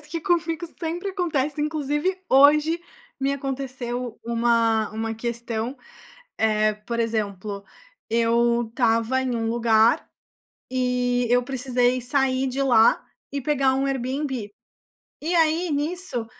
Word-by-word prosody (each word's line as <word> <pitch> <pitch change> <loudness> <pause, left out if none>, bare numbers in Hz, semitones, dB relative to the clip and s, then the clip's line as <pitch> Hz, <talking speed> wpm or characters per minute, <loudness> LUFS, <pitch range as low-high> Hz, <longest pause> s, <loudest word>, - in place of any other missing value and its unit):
parece 295 - -17
que 330 +1 -4
comigo 340 -1 0
sempre 345 +4 -3
acontece. 305 -6 -1
Inclusive, 300 +4 -1
hoje 300 +5 +5 0.4
me 270 +1 +1
aconteceu 255 -3 -4
uma 230 -2 +2
uma 225 +1 -3
questão. 235 +1 -4 0.6
Eh, 215 -1 +2
por 215 +3 -5
exemplo, 205 -3 -2 0.5
eu 235 +1 +2
estava 230 +2 +1
em 255 -2 -1
um 225 -1 -1
lugar 225 -1 +3 0.6
e 250 -1 0
eu 245 +1 +4
precisei 255 -1 0
sair 260 +1 +1
de 260 +2 -2
lá 235 -4 +4 0.3
e 280 - -3
pegar 275 -1 +2
um 270 +1 0
Airbnb. 265 -3 -3 0.7
E 335 +4 -1
aí, 330 +1 +2
nisso, 295 -4 -2
255 Hz, 120 wpm, -24 LUFS, 230-290 Hz, 0.7 s, hoje